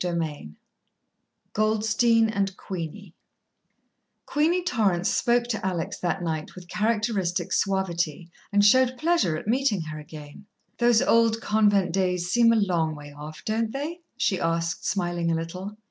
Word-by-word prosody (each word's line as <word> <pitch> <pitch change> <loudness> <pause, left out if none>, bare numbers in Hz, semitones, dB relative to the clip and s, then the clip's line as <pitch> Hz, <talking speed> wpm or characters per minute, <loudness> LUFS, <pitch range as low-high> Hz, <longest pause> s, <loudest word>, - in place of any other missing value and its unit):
VIII 160 - -3 1.0
Goldstein 220 +2 +2
and 200 -3 -2
Queenie 180 +1 -7 1.1
Queenie 335 +5 +1
Torrance 195 - +1
spoke 240 0 +2
to 230 -4 -4
Alex 180 -4 -2
that 175 0 -2
night 160 -2 -4
with 180 -1 -11
characteristic 210 -3 -1
suavity, 175 -4 -1 0.2
and 205 0 +4
showed 255 +3 +4
pleasure 310 - +1
at - - -8
meeting 235 -5 +1
her 155 -1 -6
again. 150 +4 -11 0.3
"Those 240 -2 +4
old 230 -1 +3
convent 205 -5 +2
days 180 -2 0
seem 235 0 +5
a - - +4
long 175 -7 +1
way 145 -1 -11
off, 150 +2 -10
don't 220 0 -1
they?" 300 +6 -4 0.2
she 195 -7 +1
asked, 165 0 -1
smiling 175 -3 -1
a - - +1
little. 185 +5 -5
195 Hz, 140 wpm, -25 LUFS, 170-225 Hz, 1.1 s, seem